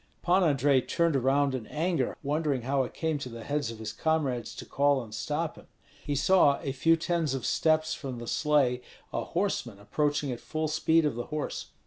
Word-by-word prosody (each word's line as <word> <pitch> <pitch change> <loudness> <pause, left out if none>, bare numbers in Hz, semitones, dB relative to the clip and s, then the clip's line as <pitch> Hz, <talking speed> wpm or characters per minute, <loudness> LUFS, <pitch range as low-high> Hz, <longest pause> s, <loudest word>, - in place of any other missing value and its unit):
Pan 180 +2 +4
Andrei 140 -3 +3
turned 170 +3 +1
around 135 +1 +2
in 125 -4 -4
anger, 160 -3 -1
wondering 145 -3 0
how 135 +1 +1
it 125 - -6
came 160 -2 -2
to 130 - -6
the 115 -1 -8
heads 145 -2 -1
of 115 - -7
his 110 0 -6
comrades 135 -5 -1
to - - -8
call 140 -2 +2
and 110 -2 -12
stop - - -2
him. - - -15 0.4
He 145 - -2
saw 145 -1 +4
a 140 - -1
few 165 +5 +3
tens 165 -4 0
of 130 -3 -4
steps 155 +4 +2
from 130 -4 -5
the 120 - -7
sleigh 135 -2 +2 0.3
a - - -1
horseman 170 - -2
approaching 145 +6 -1
at 120 - -5
full 155 0 -3
speed 160 +1 +2
of 150 - +1
the 120 +1 -4
horse. 150 -1 -4
145 Hz, 200 wpm, -29 LUFS, 125-155 Hz, 0.4 s, Pan